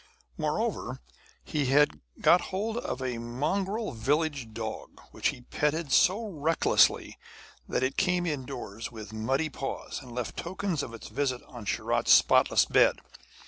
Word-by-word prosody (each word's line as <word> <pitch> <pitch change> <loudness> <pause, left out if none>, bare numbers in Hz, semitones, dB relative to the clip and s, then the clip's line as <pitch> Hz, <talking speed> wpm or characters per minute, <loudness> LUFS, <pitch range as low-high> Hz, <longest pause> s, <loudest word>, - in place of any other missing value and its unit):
Moreover, - - -2 0.4
he 145 -4 -1
had 140 - +3 0.2
got 180 - +6
hold 215 +4 -2
of 130 - -3
a 125 -3 -2
mongrel 190 - -2
village 140 +1 -1
dog 110 0 -6
which - - -1
he 125 - -3
petted 150 +4 -1
so 200 - +4
recklessly 165 -4 +2 0.5
that - - 0
it 130 +1 -1
came 180 -2 +2
indoors 125 - -5
with 110 -1 -9
muddy 135 +8 0
paws, 135 - -5
and 125 -3 -12
left 120 -1 -4
tokens 180 -2 -2
of 115 - -6
its 115 - -10
visit 130 -3 -1
on 120 -4 -11
Sharat's - - +2
spotless - - +5
bed. - - +4
140 Hz, 140 wpm, -28 LUFS, 120-170 Hz, 0.5 s, got